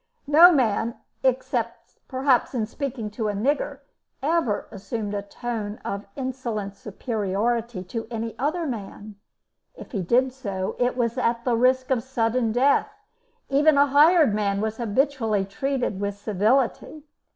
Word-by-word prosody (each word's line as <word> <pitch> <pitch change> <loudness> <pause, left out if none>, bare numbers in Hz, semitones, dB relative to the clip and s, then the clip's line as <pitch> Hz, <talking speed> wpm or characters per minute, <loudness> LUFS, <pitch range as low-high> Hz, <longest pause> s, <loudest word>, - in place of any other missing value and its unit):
No 320 +5 +8
man 235 -5 +1 0.3
except, 235 -3 -2
perhaps, 260 -1 +1
in 225 -3 0
speaking 235 -2 -5
to 215 +1 -3
a - - -1
nigger 280 +5 -1 0.4
ever 300 -8 0
assumed 210 0 -5
a 205 - -2
tone 210 0 -5
of 200 +1 -4
insolent 240 -7 -4
superiority 215 0 -2
to 225 +5 -5
any 230 -1 -4
other 310 +5 -1
man; 210 -4 -7 0.6
if - - -11
he 200 - -2
did 250 +8 +2
so, 200 -8 -4
it 245 0 +1
was 235 0 0
at 235 -1 0
the 245 -2 +2
risk 255 +2 +2
of 250 -3 +2
sudden 230 -2 0
death; 265 - +3 0.6
even 290 +2 +4
a 285 - +6
hired 295 - +5
man 200 -1 0
was 220 +1 -2
habitually 230 -3 0
treated 260 -1 -2
with 200 0 -3
civility. 225 +8 0
235 Hz, 140 wpm, -24 LUFS, 210-265 Hz, 0.6 s, No